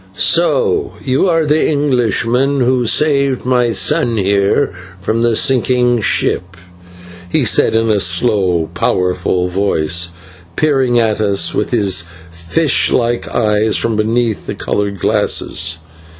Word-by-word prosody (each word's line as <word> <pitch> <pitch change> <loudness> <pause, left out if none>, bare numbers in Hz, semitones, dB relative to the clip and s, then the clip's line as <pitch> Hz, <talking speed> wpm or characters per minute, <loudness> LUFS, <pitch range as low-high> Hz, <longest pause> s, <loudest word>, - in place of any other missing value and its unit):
"So 435 -5 +1
you 135 +8 +1
are 165 -2 +1
the 150 +1 +1
Englishman 135 -1 0
who 125 -1 +1
saved 140 -2 +1
my 125 -2 +1
son 115 +2 0
here 100 -2 +1 0.3
from 110 +5 -2
the 120 -1 +1
sinking 125 -1 +1
ship," 95 -2 0 0.7
he - - +1
said - - +2
in 115 0 +1
a 105 - +1
slow, 90 -3 0
powerful 90 0 -1
voice, 85 -3 -1 0.5
peering 135 - +1
at 110 -2 +1
us 100 -2 0
with - - -2
his 95 -8 0 0.3
fish 85 - 0
like 120 0 0
eyes 110 -2 +1
from 115 -1 0
beneath 110 0 -1
the - - -4
coloured 100 -1 -3
glasses. 85 0 0
115 Hz, 125 wpm, -14 LUFS, 100-130 Hz, 0.7 s, said